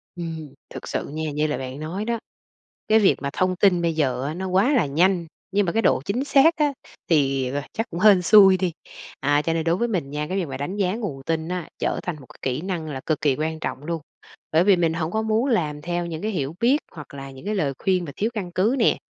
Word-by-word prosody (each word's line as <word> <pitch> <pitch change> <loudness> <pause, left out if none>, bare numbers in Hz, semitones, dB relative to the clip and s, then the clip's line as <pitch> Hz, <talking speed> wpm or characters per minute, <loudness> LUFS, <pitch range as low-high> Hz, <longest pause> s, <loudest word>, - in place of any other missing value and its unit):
Ừm, 160 -4 -6 0.2
thực - - -8
sự - - -3
nha, 155 0 -3
như 150 +1 0
là 150 - -2
bạn 130 +1 -6
nói 175 +7 -4
đó, 235 -1 -1 0.7
cái 220 +1 +5
việc 200 - +4
mà 140 - -2
thông 185 0 +1
tin 180 -2 +3
bây 170 -1 +1
giờ 130 -5 0
á 150 - -3
nó 190 +3 -4
quá 195 +10 +3
là 250 - +3
nhanh, 170 +4 +2 0.2
nhưng 200 +1 +2
mà 170 - 0
cái 225 - +1
độ 130 - +3
chính 240 +7 -1
xác 290 +3 +5
á, 295 -2 +1 0.4
thì, 135 -5 +2
à, 145 0 -3
chắc 225 - -3
cũng 170 - -5
hên 200 -2 +6
xui 190 +1 +7
đi. 185 -2 0 0.5
À, 145 +1 +2
cho 165 +2 -1
nên 165 -1 0
đối 165 +1 +2
với 235 +6 0
mình 180 -11 -2
nha, 150 +1 -3
cái 185 - -2
việc 185 - 0
mà 135 -1 -5
đánh 145 +8 -4
giá 195 -1 0
nguồn 180 - -5
tin 160 +1 -2
á 180 -2 -3
trở - - -1
thành 175 -3 -3
một 135 - -13
cái - - -21
kỹ 130 +2 -1
năng 175 -3 -3
là 135 -3 -5
cực 155 - -1
kỳ 140 -3 +2
quan 155 +2 -3
trọng 145 - -4
luôn. 165 -1 -3 0.5
Bởi 160 +2 +4
vì 200 0 +5
mình 165 -2 +2
hổng 165 0 -2
có 220 - 0
muốn 220 +2 +1
làm 150 - 0
theo 175 +2 -2
những 165 -1 -5
cái 215 - -1
hiểu 155 -5 -3
biết 250 +6 +4
hoặc 150 -4 -11
là 135 -1 -8
những 135 +5 -12
cái 210 +1 -1
lời 145 -8 0
khuyên 185 -2 +1
mà 145 - -7
thiếu 220 +3 0
căn 195 -6 -4
cứ 200 +8 +2
nè. - - +3
170 Hz, 265 wpm, -23 LUFS, 150-195 Hz, 0.7 s, xui